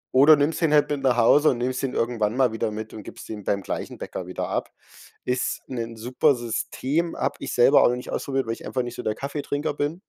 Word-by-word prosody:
oder 145 +4 +8
nimmst 150 +4 0
den 160 -2 +3
halt 150 0 +4
mit 140 -2 -1
nach 125 -2 +3
Hause 145 +6 +5
und 120 - -2
nimmst 130 +1 -1
ihn 130 - -1
irgendwann 115 -1 0
mal 130 -4 +3
wieder 110 - -1
mit 110 +1 -6
und 110 - -7
gibst - - -10
den 105 -2 -6
beim 100 0 -1
gleichen - - -5
Bäcker - - -6
wieder - - -4
ab. - - -2 0.6
Ist 125 0 -1
'nen 115 -3 -5
super 125 +5 +2
System, 130 +7 -2
hab 140 +2 -1
ich - - -5
selber 125 +4 +6
auch - - +5
nicht 125 - -7
ausprobiert, 135 -2 -1
weil 115 - -1
ich - - -10
einfach 125 -1 -1
nicht 120 0 -6
so - - -5
der 110 0 -1
Kaffeetrinker 145 +1 -3
bin,, 150 +6 -3
130 Hz, 240 wpm, -24 LUFS, 115-145 Hz, 0.6 s, oder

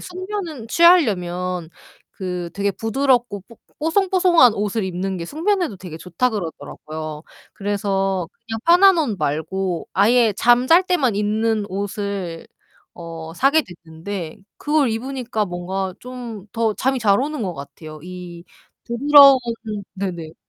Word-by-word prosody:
숙면은 365 - -6
취하려면 180 - +3 0.4
그 180 -2 -5
되게 200 0 0
부드럽고 240 -1 0
뽀 230 - -16 0.2
뽀송뽀송한 345 - +4
옷을 210 +1 -2
입는 190 +1 -3
게 170 - -5
숙면에도 340 - -1
되게 175 -4 -9
좋다 180 +9 -1
그러더라고요. 155 -4 -6 0.3
그래서 195 -3 -1 0.2
그냥 225 -1 -4
편한 380 +1 +7
옷 240 -10 0
말고 165 +5 -2
아예 220 +3 +4
잠 245 +2 +4
잘 335 +5 +6
때만 275 - +1
입는 215 0 0
옷을 200 -3 -4 0.5
어 165 -1 -8
사게 275 - +3
됐는데 170 0 -8 0.2
그걸 295 -3 +1
입으니까 240 -1 -3
뭔가 185 +1 -4
좀 240 -5 -8
더 225 -2 0
잠이 265 +4 0
잘 205 -1 +3
오는 295 -2 -3
것 185 -3 -2
같아요. 155 +1 -10
이 180 -1 -9 0.4
부드러운 275 +2 +7 0.6
네네. 175 -5 -5
205 Hz, 265 characters per minute, -21 LUFS, 180-260 Hz, 0.6 s, 편한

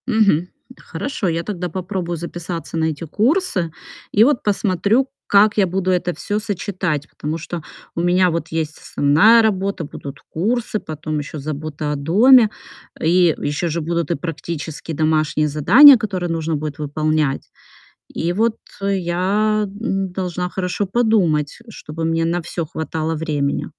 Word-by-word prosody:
Мгм. 205 -8 +3 0.3
Хорошо, 215 -9 -3
я 165 0 -1
тогда 180 -2 -4
попробую 180 0 -3
записаться 170 0 -6
на 160 - +1
эти 160 -1 -3
курсы 215 - 0 0.4
и 210 - +5
вот 270 +1 +3
посмотрю, 205 +4 +1 0.2
как 210 +2 +4
я 195 -2 +4
буду 185 +1 -1
это 180 -1 0
всё 205 +1 -2
сочетать. 185 -8 -3
Потому 155 +2 -4
что 165 +1 -6 0.3
у 170 - -1
меня 180 +1 +3
вот 170 0 -2
есть 155 -2 -2
основная 195 +12 +4
работа, 200 -4 0
будут 145 -1 -8 0.2
курсы, 220 +5 0
потом 155 -2 -5
ещё 145 +1 -6
забота 150 +1 -4
о - - -1
доме. 215 - +5 0.5
И 170 0 +3
ещё 145 +4 -2
же 165 +1 -2
будут 170 +2 -2
и - - +2
практические 160 0 -5
домашние 155 0 +1
задания, 220 - +8
которые 185 -5 -3
нужно 165 -1 -1
будет 150 0 -5
выполнять. 150 -1 0 0.8
И 170 +2 0
вот 225 +3 +1 0.4
я 195 +4 +1 0.2
н 195 -5 -1
должна 180 -1 -3
хорошо 180 +2 -2
подумать, 190 -9 +1
чтобы 160 -6 -6
мне 165 0 +1
на 175 +1 0
всё 170 0 -4
хватало 160 0 -3
времени. 150 -3 -1
170 Hz, 145 wpm, -20 LUFS, 155-200 Hz, 0.8 s, задания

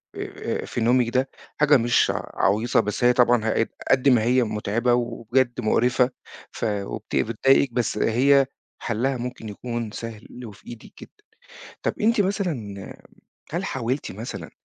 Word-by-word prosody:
آآ - - -4
في 120 - -4
نومِك 120 0 +3
ده 130 +2 0 0.3
حاجة 150 -1 +6
مش 120 0 +2
ع - - -5 0.2
عَويصة، 110 +5 +2
بس 105 +2 -2
هي 125 0 +6
طبعًا 120 -2 +3
ه - - +1
قد 115 - 0 0.2
قد 135 +1 +4
ما 120 -4 +4
هي 125 +1 +3
مُتعبة 110 +3 0
وبجد 120 +1 0
مُقرِفَة 125 +3 +2 0.4
ف - - -4
وبت 100 -2 -4
بتضايقِك، 125 +3 +2
بس 120 -3 -1
هي 135 +6 +4 0.4
حلّها 125 +3 -1
ممكن 120 -3 -6
يكون 115 +1 -5
سهل 115 +2 -8
وفي 105 -3 -13
إيدِك 115 -2 -11
جدًا. - - -11 0.7
طَب - - -1
أنتِ 220 0 +3
مثلًا 150 - -3 0.6
هل 175 +3 -2
حاولتِ 130 - -3
مثلًا 100 -5 -7
120 Hz, 150 wpm, -24 LUFS, 110-130 Hz, 0.7 s, حاجة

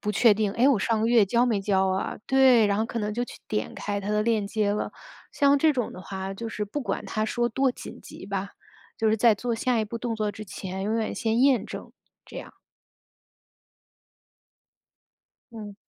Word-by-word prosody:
不 210 - -2
确 215 0 +5
定： 210 -1 0
“哎， 250 +4 +4
我 270 - +4
上 220 +2 0
个 225 - +1
月 230 -3 +5
交 235 +5 +2
没 215 -4 +1
交 190 -1 +2
啊？” 190 0 -2
对， 260 -5 +5
然 200 0 +1
后 220 - +1
可 235 - -4
能 210 0 -2
就 245 +1 -1
去 - - -12
点 210 - -2
开 205 -1 -3
他 200 +1 -4
的 210 0 +1
链 220 -2 +1
接 205 -1 0
了。 210 - -2 0.4
像 280 0 +4
这 310 +1 +4
种 245 -5 -2
的 - - -9
话， 190 0 -5
就 230 +3 -5
是 210 -1 -3
不 290 +9 -4
管 200 -6 -3
他 215 -1 -1
说 240 +2 0
多 265 +3 +1
紧 - - -10
急 - - -11
吧， 200 0 -3 0.5
就 220 - +2
是 220 - +3
在 225 0 +5
做 235 +3 -2
下 240 0 0
一 - - 0
步 230 +3 -6
动 235 -1 -3
作 210 -1 -1
之 215 +1 -8
前， 190 0 -6
永 220 +2 0
远 220 -1 -2
先 230 0 0
验 270 -3 +4
证， - - -8 0.3
这 - - -8
样。 - - -10 3.0
嗯。 210 -3 -8
220 Hz, 225 characters per minute, -26 LUFS, 205-240 Hz, 3.0 s, 确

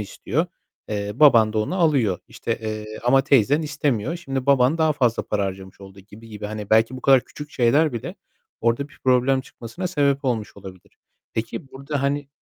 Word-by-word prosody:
istiyor. 115 - -2 0.4
Eee, 105 -1 -3
baban 120 -6 +5
da 110 - -1
onu 110 +11 -1
alıyor, 135 - +2
işte, 115 0 -4
eee, 110 0 -5
ama 135 +2 +4
teyzen 140 +3 +3
istemiyor. 145 -2 -1
Şimdi 135 -6 -4
baban 140 +2 +3
daha 160 -1 +3
fazla 125 -5 +1
para 105 -1 -1
harcamış 95 0 -7
oldu 95 0 -13
-gibi 105 +3 -15
gibi 105 -1 -7
hani 105 -1 -7
belki 115 +3 +3
bu - - -9
kadar 135 0 +5
küçük 150 0 -10
şeyler 140 +5 +2
bile 115 - -5 0.5
orada 120 +5 0
bir - - -20
problem 130 +1 +3
çıkmasına 130 +8 -7
sebep 140 -5 0
olmuş 115 -5 -2
olabilir. 95 -2 -13 0.4
Peki, 115 +6 -4
burada 140 +1 -4
hani 140 0 -1
125 Hz, 180 wpm, -22 LUFS, 110-140 Hz, 0.5 s, baban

